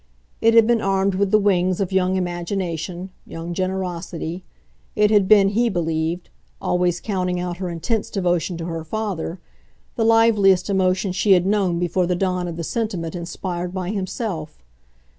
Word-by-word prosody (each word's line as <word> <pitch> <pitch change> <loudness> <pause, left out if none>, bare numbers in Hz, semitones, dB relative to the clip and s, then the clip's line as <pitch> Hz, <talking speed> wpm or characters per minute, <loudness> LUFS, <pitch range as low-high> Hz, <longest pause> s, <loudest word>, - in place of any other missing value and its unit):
It 225 0 +4
had 230 -1 +7
been 235 0 +2
armed 195 0 +1
with 195 +1 +1
the 215 - +5
wings 185 -3 +2
of 195 -2 -1
young 190 0 +2
imagination, 175 0 -3
young 165 +1 -6
generosity; 180 -2 -3 0.5
it 210 0 +3
had 205 -3 +4
been, 200 -2 +6
he 235 +4 +2
believed 165 -1 -2 0.3
always 180 -1 0
counting 180 -3 -2
out 175 -1 -3
her 185 -1 -4
intense 175 +6 -2
devotion 175 -3 0
to 165 - -5
her 165 -1 -4
father 190 -2 -4 0.6
the 225 - +2
liveliest 215 -4 +4
emotion 185 0 +1
she 195 +2 +3
had 180 -1 +3
known 195 -4 +1
before 175 +1 0
the 180 - +1
dawn 180 -1 -1
of 170 -1 -5
the 170 - -3
sentiment 185 -5 -3
inspired 175 +1 -4
by 185 0 -2
himself. 185 -5 -4
185 Hz, 160 wpm, -22 LUFS, 175-200 Hz, 0.6 s, had